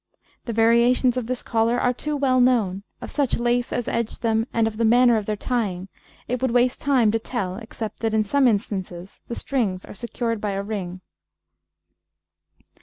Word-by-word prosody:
The 235 - -3
variations 235 +3 +3
of 250 -3 -3
this 255 0 -3
collar 230 +2 +1
are 250 - +2
too 295 +4 -3
well 260 -2 +3
known; 220 -7 +2 0.2
of - - -7
such 280 -4 +1
lace 240 0 0
as 245 - -2
edged 235 0 -2
them 225 0 +1
and 230 -1 +2
of 220 -1 -3
the 230 - 0
manner 240 +1 +5
of 215 -2 -2
their 215 - 0
tying, 200 -5 -2 0.4
it 250 0 -2
would 260 - +1
waste 245 +1 +2
time 255 -6 +3
to 225 - 0
tell, 195 -6 -4
except 220 -1 -7
that 225 -1 -1
in 215 - +3
some 270 +5 +3
instances 195 -4 -3
the 235 - -4
strings 210 -9 -2
are - - -10
secured 230 0 -3
by 205 -2 -2
a 195 0 -2
ring. 185 -4 -5
230 Hz, 185 wpm, -23 LUFS, 210-245 Hz, 0.4 s, manner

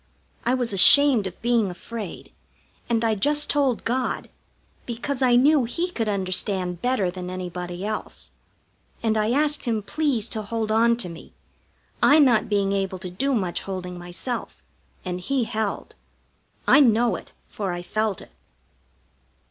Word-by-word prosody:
I 250 - +3
was 245 -4 -2
ashamed 245 +2 +6
of 185 - -10
being 235 -4 +2
afraid, 205 +3 -8 0.6
and 230 -1 +1
I 225 - +2
just 295 +9 +1
told 275 -5 +1
God, 255 +2 -2 0.6
because 250 +3 -3
I 250 -2 +4
knew 275 +1 +4
He 345 +9 -2
could 225 -9 -2
understand 185 -2 -1
better 245 -8 +1
than 180 0 -7
anybody 180 0 -5
else; 215 0 -5 0.7
and 220 -1 +1
I 215 0 +1
asked 295 +4 +2
Him 225 -3 -1
please 245 0 0
to 220 - -2
hold 220 +1 -3
on 230 +1 +3
to 240 - -3
me, 165 -1 -11 0.7
I 290 - +6
not 250 -8 +4
being 200 -2 +1
able 195 -1 -1
to 180 -1 -7
do 270 +9 0
much 185 -6 -1
holding 185 -2 -6
myself, 175 +8 -6 0.4
and 180 -1 -3
He 270 +5 0
held. 220 -2 -3 0.7
I - - +7
know 240 -3 +4
it, - - -10 0.2
for 200 -3 -4
I 175 0 -5
felt 215 0 -1
it. - - -15
220 Hz, 155 wpm, -24 LUFS, 190-250 Hz, 0.7 s, I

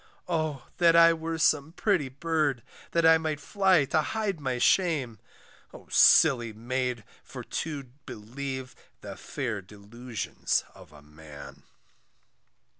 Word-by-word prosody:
Oh! 155 -7 -2
that 170 -1 +5
I 165 0 +7
were 165 0 -4
some 150 0 +1
pretty 185 -9 0
bird, 145 -3 -1 0.3
That 170 -1 +1
I 160 0 +6
might 155 -2 -3
fly 190 -2 +2
to 155 +3 +1
hide 205 -2 -3
my 130 -3 -2
shame; 135 - +1 0.6
O - - -14
silly 120 -7 +5
maid, 125 +1 -3 0.2
for - - -9
to 150 -3 -5 0.2
believe 130 +4 -7 0.3
The - - -8
fair 115 -6 -5
delusions 105 +5 -4
of - - -16
a 75 -1 -16
man. 75 -1 -13
140 Hz, 125 wpm, -27 LUFS, 120-160 Hz, 0.6 s, I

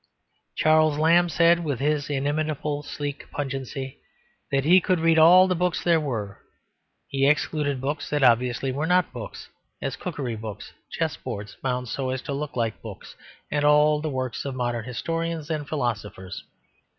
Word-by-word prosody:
Charles 155 -1 +4
Lamb 170 +3 +4
said 170 +1 +4
with 145 -6 -2
his 150 +1 0
inimitable 145 +1 -1
sleek 145 0 -6
pungency 135 -1 -5 0.5
that 135 -1 +2
he 180 +5 +6
could 185 -1 +1
read 165 0 +4
all 180 +4 +8
the 185 - +1
books 180 -1 -1
there 170 -2 +4
were; 110 -9 -4 0.7
he 135 0 +1
excluded 150 -2 +1
books 140 +4 -3
that 145 -2 0
obviously 125 +2 +3
were 145 +5 -2
not 180 -3 +2
books, 120 -3 -8 0.3
as - - -3
cookery 125 -5 -4
books, 110 -2 -8 0.2
chessboards 100 0 -4
bound 125 -1 -2
so 130 +2 -3
as 130 0 -3
to 140 - -4
look 145 +1 -4
like 115 -3 -2
books, - - -10 0.4
and 145 0 0
all 150 0 +4
the 155 - -2
works 130 -3 -3
of 140 -2 -4
modern 120 -2 -2
historians 165 +4 -3
and 150 -2 -3
philosophers. 105 -9 -4
145 Hz, 160 wpm, -25 LUFS, 130-155 Hz, 0.7 s, all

